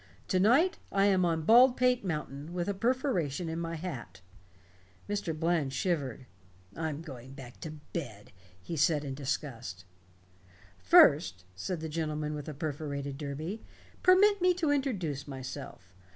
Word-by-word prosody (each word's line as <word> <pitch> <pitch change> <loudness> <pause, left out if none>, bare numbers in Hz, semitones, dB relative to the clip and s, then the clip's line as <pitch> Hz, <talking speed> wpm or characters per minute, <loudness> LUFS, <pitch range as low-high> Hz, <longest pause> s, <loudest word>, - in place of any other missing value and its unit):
To 185 - +2
night 265 - +4
I 195 0 +3
am 190 -3 +4
on 165 -2 0
Baldpate 250 +2 +5
Mountain, 150 -3 -4
with 175 -1 -2
a 200 - 0
perforation 195 - 0
in 165 +1 -3
my 165 0 -3
hat." 130 - -7 0.9
Mr. 200 -6 -2
Bland 165 -5 +1
shivered. 140 -6 -2 0.5
"I'm 160 -1 -3
going 130 -4 -10
back 130 -3 -11
to 155 - -6 0.2
bed," 115 -11 -6 0.3
he 165 - -6
said 150 0 +2
in 135 - -4
disgust. 130 -8 -4 0.9
"First," 90 0 +5 0.2
went 180 - -1
on - - -10
the 160 - -3
gentleman 155 -1 -2
with 150 -1 -5
the 155 - -6
perforated 140 -2 -4
derby, 155 +8 -5 0.4
"permit 400 +2 +5
me 360 0 +4
to 325 -5 +1
introduce 185 - -1
myself. 130 -8 -8
155 Hz, 145 wpm, -30 LUFS, 140-190 Hz, 0.9 s, Baldpate